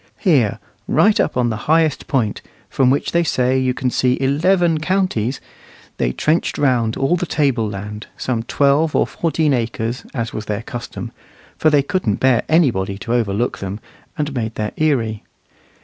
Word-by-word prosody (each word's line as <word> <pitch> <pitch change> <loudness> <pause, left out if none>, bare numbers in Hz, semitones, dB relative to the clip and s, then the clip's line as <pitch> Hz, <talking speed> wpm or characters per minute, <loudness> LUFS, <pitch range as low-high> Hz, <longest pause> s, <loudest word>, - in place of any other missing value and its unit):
Here, 140 - +2 0.3
right 210 0 +3
up - - 0
on 120 -2 +2
the - - -2
highest 160 -2 +2
point, 115 -7 0 0.3
from 130 -2 +3
which 140 - 0
they 170 - +3
say 130 -4 +1
you 130 -1 0
can 130 -1 -1
see 125 +1 +1
eleven 165 +4 +2
counties, 155 - 0 0.6
they - - 0
trenched 155 - 0
round 120 -5 +1
all 135 +6 +2
the 180 0 -2
table 130 -9 +1
land, 105 +1 -7
some 120 -3 -2
twelve 140 +6 +2
or - - +3
fourteen 160 -3 0
acres, 115 0 -2
as 115 -3 -3
was 110 - -5
their 105 +1 -3
custom, 120 -1 -7 0.4
for 155 - +3
they 145 -2 +3
couldn't 140 - 0
bear 130 -3 +3
anybody 115 - +2
to 115 +4 -4
overlook 115 0 0
them, 100 +2 -5 0.4
and 150 -2 -2
made 115 -3 -3
their 105 -1 -2
eyrie. 120 -9 0
130 Hz, 165 wpm, -19 LUFS, 115-155 Hz, 0.6 s, right